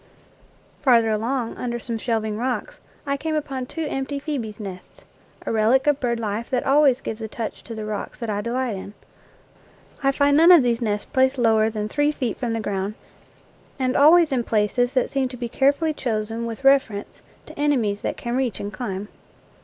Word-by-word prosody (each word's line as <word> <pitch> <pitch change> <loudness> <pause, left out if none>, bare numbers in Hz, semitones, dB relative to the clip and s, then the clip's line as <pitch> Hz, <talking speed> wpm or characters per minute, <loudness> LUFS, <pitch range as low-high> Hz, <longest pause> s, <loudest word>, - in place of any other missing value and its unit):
Farther 235 -5 +4
along, 230 +3 -2
under 240 -1 -3
some 230 -1 -4
shelving 220 -2 -1
rocks, 255 - -3 0.3
I 280 0 -1
came 315 +2 -2
upon 270 -4 -3
two 325 +3 -4
empty 275 +1 -3
phcebes' 250 -8 -4
nests 190 -3 -9 0.4
a - - -2
relic 225 +4 +3
of 295 -1 +2
bird 235 -3 -1
life 220 +1 -3
that 250 -2 -1
always 275 -2 +4
gives 220 +1 -5
a 220 - -3
touch 225 0 -6
to 230 - -7
the 215 -1 -5
rocks 210 -1 -5
that 235 - -5
I 205 -1 -1
delight 240 0 -2
in. 195 +2 -8 1.1
I 275 0 +3
find 285 +1 +3
none 330 +4 +7
of 340 -6 +8
these 240 0 0
nests 210 -2 -1
placed 265 -1 +2
lower 220 -2 +3
than 210 -1 -3
three 290 +6 +1
feet 250 -7 -3
from 240 -3 -2
the 225 - -1
ground, 200 -1 -3 0.8
and 255 -1 0
always 315 +2 +6
in 250 -3 +1
places 235 +4 +1
that 255 - +1
seem 270 -1 0
to 250 0 -9
be 240 0 -3
carefully 285 +6 +2
chosen 225 -3 -3
with 230 +3 -7
reference 270 -7 +2 0.2
to - - -12
enemies 240 -9 +1
that - - -3
can 240 0 -3
reach 250 -7 -1
and 205 +1 -5
climb. 205 -5 -4
240 Hz, 195 wpm, -23 LUFS, 220-275 Hz, 1.1 s, of